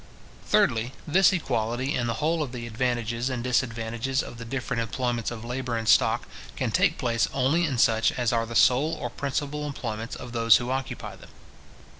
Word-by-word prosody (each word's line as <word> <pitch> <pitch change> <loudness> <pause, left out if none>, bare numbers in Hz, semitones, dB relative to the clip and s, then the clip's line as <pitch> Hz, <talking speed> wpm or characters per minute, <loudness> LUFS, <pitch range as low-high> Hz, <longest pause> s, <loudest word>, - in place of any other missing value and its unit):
Thirdly, 115 +3 +2
this 185 +5 +5
equality 125 - -1
in 120 -2 -1
the 115 - -1
whole 160 +6 0
of 135 -4 -4
the 120 -2 -5
advantages 120 +1 -1
and 125 -2 -3
disadvantages 120 +1 -1
of 120 - -9
the 115 - -7
different 125 0 -2
employments 120 0 -2
of 115 -1 -7
labour 125 -1 -3
and 115 -1 -4
stock, - - +4 0.3
can - - -1
take - - +2
place 115 -4 +1
only 160 +7 +2
in 135 -5 -2
such 110 -1 +3
as 120 -2 0
are 115 -1 0
the 115 - -7
sole 130 +8 +4
or 120 -6 -5
principal 145 +2 -3
employments 115 -5 -5
of 125 - -8
those 115 -2 +5
who 125 +1 -4
occupy 135 0 -4
them. - - -15
120 Hz, 185 wpm, -26 LUFS, 115-135 Hz, 0.3 s, this